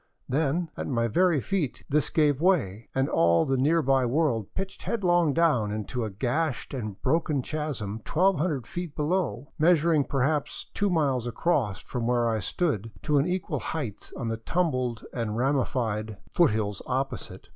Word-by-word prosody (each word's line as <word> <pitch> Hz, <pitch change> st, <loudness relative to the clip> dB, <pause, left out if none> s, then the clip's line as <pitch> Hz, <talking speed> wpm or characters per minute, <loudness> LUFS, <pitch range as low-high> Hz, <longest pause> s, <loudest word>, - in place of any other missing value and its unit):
Then 160 Hz, +4 st, 0 dB
at -, -, -4 dB
my 115 Hz, -3 st, +1 dB
very 175 Hz, -, +3 dB
feet 165 Hz, -3 st, -2 dB
this 150 Hz, +1 st, +2 dB
gave 150 Hz, -3 st, +2 dB
way, 125 Hz, -, +1 dB
and 135 Hz, +1 st, +2 dB
all 85 Hz, -, +3 dB
the 135 Hz, -, +1 dB
nearby 135 Hz, -1 st, +3 dB
world 125 Hz, -4 st, 0 dB
pitched 195 Hz, 0 st, -5 dB
headlong 175 Hz, -8 st, +2 dB
down 140 Hz, -10 st, +2 dB
into 110 Hz, +3 st, -3 dB
a 110 Hz, -, -2 dB
gashed 130 Hz, +10 st, -2 dB
and 110 Hz, -6 st, -5 dB
broken 150 Hz, -1 st, +1 dB
chasm 125 Hz, -10 st, -4 dB
1200 165 Hz, -, +1 dB
feet 175 Hz, 0 st, -6 dB
down, 150 Hz, -4 st, -1 dB
measuring 160 Hz, -2 st, +4 dB
perhaps 140 Hz, +2 st, -1 dB
two 205 Hz, -, +1 dB
miles 140 Hz, -8 st, +1 dB
across 120 Hz, -, 0 dB
from 120 Hz, -2 st, -3 dB
where 120 Hz, -1 st, +2 dB
I 110 Hz, -1 st, +1 dB
stood 115 Hz, -, -1 dB
to 150 Hz, -1 st, +3 dB
an 140 Hz, -, +1 dB
equal 180 Hz, 0 st, -2 dB
height 125 Hz, -11 st, -5 dB
on 120 Hz, -, -3 dB
the 115 Hz, -, -2 dB
tumbled 130 Hz, -3 st, -1 dB
and 115 Hz, -3 st, -2 dB
ramified 120 Hz, -5 st, 0 dB, 0.2 s
foothills 105 Hz, -, +2 dB
opposite. 135 Hz, +2 st, -3 dB
135 Hz, 155 wpm, -27 LUFS, 115-160 Hz, 0.2 s, measuring